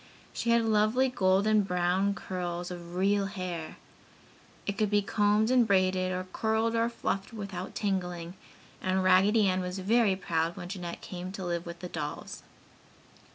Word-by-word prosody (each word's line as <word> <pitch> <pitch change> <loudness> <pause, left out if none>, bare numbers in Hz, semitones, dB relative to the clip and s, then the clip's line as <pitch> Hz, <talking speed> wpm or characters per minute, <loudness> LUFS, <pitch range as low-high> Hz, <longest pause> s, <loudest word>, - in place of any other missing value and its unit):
She 235 - -2
had 235 -1 +4
lovely 220 +4 +3
golden 205 -1 +3
brown 185 +1 +1
curls 180 -1 -4
of 175 0 -8
real 195 +2 +2
hair. 180 -5 -5 0.9
It 200 - -2
could 210 0 +1
be 205 0 +2
combed 210 +2 +2
and 250 -3 +4
braided, 185 -2 +2
or 185 0 -3
curled 220 +1 +1
or 230 0 +2
fluffed 200 -2 -3
without 195 -4 -6
tangling, 180 -4 -2 0.5
and 185 0 +1
Raggedy 200 +3 +5
Ann 185 0 +1
was 180 +1 -4
very 205 +1 +3
proud 165 -2 -1
when 175 - -7
Jeanette 180 -3 -6
came 180 0 -6
to 190 -2 -5
live 170 -1 -2
with 170 0 -8
the 180 - -4
dolls. - - -5
190 Hz, 155 wpm, -29 LUFS, 180-210 Hz, 0.9 s, Raggedy